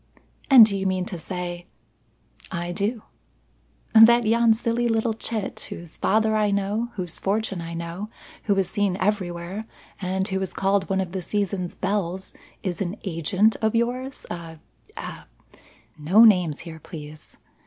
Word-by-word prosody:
"And 255 -5 +10
do 205 -2 -2
you 195 0 -1
mean 185 -1 0
to 180 -2 -6
say 175 0 -5 0.4
" - - -24
"I 175 - -4
do 210 +5 -2 0.4
" - - -38
"That 230 +1 +8
yon 230 0 +4
silly 235 +1 0
little 225 0 +1
chit, 220 -1 -4
whose 170 -2 -9
father 220 +1 +2
I 210 -1 +2
know, 200 +4 -1
whose 180 -4 -5
fortune 200 -2 -1
I 165 0 -6
know, 170 +5 -5 0.4
who 205 - +2
is 195 -2 +1
seen 200 -2 0
everywhere, 190 0 -2 0.4
and 190 +1 -1
who 190 -2 -2
is 190 - -4
called 195 0 +1
one 190 0 +1
of 185 -2 -4
the 190 0 -3
season's 195 -1 -2
belles 190 -1 -2 0.3
is 180 -3 -3
an 185 +1 -2
agent 190 +4 +1
of 220 0 +1
yours; 250 +3 -2
a 165 -2 -7 0.4
a - - -7 0.4
" - - -29
"No 190 +10 +6
names 180 -8 +4
here, 165 -2 -9
please. 155 -2 -11
195 Hz, 165 wpm, -24 LUFS, 175-220 Hz, 0.4 s, And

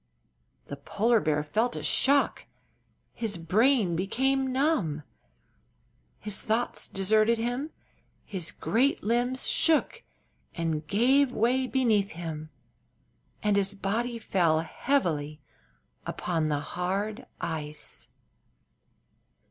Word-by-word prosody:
The 140 - -7
polar 210 +11 +1
bear 150 -5 0
felt 220 +11 0
a - - -5
shock; 280 +1 +2 0.7
his 220 -5 -3
brain 200 - +2
became 265 +9 0
numb; 255 - 0 1.1
his 210 -2 -4
thoughts 225 +2 -2
deserted 215 +4 +2
him; 245 +6 -2 0.6
his 185 -5 -4
great 260 +6 0
limbs 245 +4 0
shook 330 +8 +3 0.5
and 160 -2 -2
gave 260 +6 +3
way 255 +3 +1
beneath 225 -7 +1
him 160 -2 -6 0.9
and 210 -1 +2
his 200 0 +1
body 225 +5 -2
fell 170 -7 +1
heavily 160 - -1 0.7
upon 165 -3 -1
the 145 -1 0
hard 195 - -3
ice. 155 -2 -6
210 Hz, 100 wpm, -28 LUFS, 165-245 Hz, 1.1 s, shook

